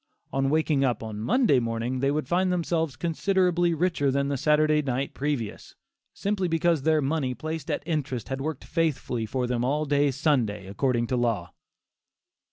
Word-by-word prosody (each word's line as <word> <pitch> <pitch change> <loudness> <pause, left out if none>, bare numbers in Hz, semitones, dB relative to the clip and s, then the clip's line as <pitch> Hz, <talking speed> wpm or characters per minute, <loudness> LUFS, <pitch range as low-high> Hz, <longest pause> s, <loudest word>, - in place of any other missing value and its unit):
On 135 0 +1
waking 155 -2 +2
up 120 -4 0
on 110 -2 -6
Monday 140 - +3
morning, 115 +2 -2
they 135 +1 +2
would 150 -1 -1
find 180 +3 +2
themselves 165 -4 0
considerably 175 0 +1
richer 160 -4 +1
than 140 +1 0
the 140 - 0
Saturday 150 +2 +3
night 135 -1 -2
previous, 140 -7 -3 0.4
simply 200 -2 -1
because 165 -2 +2
their 155 +1 +2
money 135 -3 -1
placed 155 0 -5
at - - -1
interest 145 -8 -2
had 135 0 -3
worked 155 -1 -4
faithfully 140 -8 -1
for 125 +3 -1
them 120 -1 -1
all 145 +4 0
day 145 0 +2
Sunday, 130 - 0
according 120 +5 0
to 125 - -1
law! 110 -8 -1
140 Hz, 170 wpm, -26 LUFS, 125-160 Hz, 0.4 s, Monday